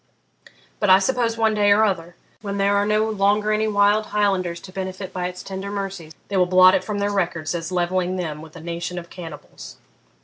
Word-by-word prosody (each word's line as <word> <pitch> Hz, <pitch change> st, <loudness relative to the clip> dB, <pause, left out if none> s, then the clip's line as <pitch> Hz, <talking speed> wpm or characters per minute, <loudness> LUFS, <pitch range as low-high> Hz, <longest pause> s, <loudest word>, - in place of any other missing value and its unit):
But 205 Hz, -, +1 dB
I 185 Hz, -, +9 dB
suppose 230 Hz, +2 st, 0 dB
one 220 Hz, -1 st, +2 dB
day 205 Hz, -1 st, +3 dB
or 210 Hz, +2 st, +5 dB
other 175 Hz, -4 st, -1 dB, 0.3 s
when 200 Hz, -2 st, -4 dB
there 200 Hz, 0 st, +2 dB
are 200 Hz, 0 st, +2 dB
no 215 Hz, +1 st, +2 dB
longer 210 Hz, 0 st, +1 dB
any 215 Hz, +1 st, +1 dB
wild 210 Hz, +1 st, +3 dB
Highlanders 190 Hz, -5 st, 0 dB
to 185 Hz, -, -11 dB
benefit 190 Hz, 0 st, -6 dB
by 180 Hz, -1 st, -2 dB
its 180 Hz, 0 st, -8 dB
tender 195 Hz, +1 st, -6 dB
mercies 195 Hz, -5 st, -5 dB
they 200 Hz, -, -2 dB
will 180 Hz, -1 st, +3 dB
blot 185 Hz, 0 st, +7 dB
it -, -, +1 dB
from 210 Hz, -1 st, -4 dB
their 205 Hz, 0 st, 0 dB
records 170 Hz, -5 st, -1 dB
as 165 Hz, 0 st, -4 dB
levelling 180 Hz, +1 st, 0 dB
them 155 Hz, -5 st, -4 dB
with 160 Hz, 0 st, -13 dB
a 165 Hz, -, -9 dB
nation 170 Hz, +2 st, -5 dB
of 170 Hz, -1 st, -8 dB
cannibals. 165 Hz, -4 st, -10 dB
190 Hz, 210 wpm, -22 LUFS, 175-205 Hz, 0.3 s, I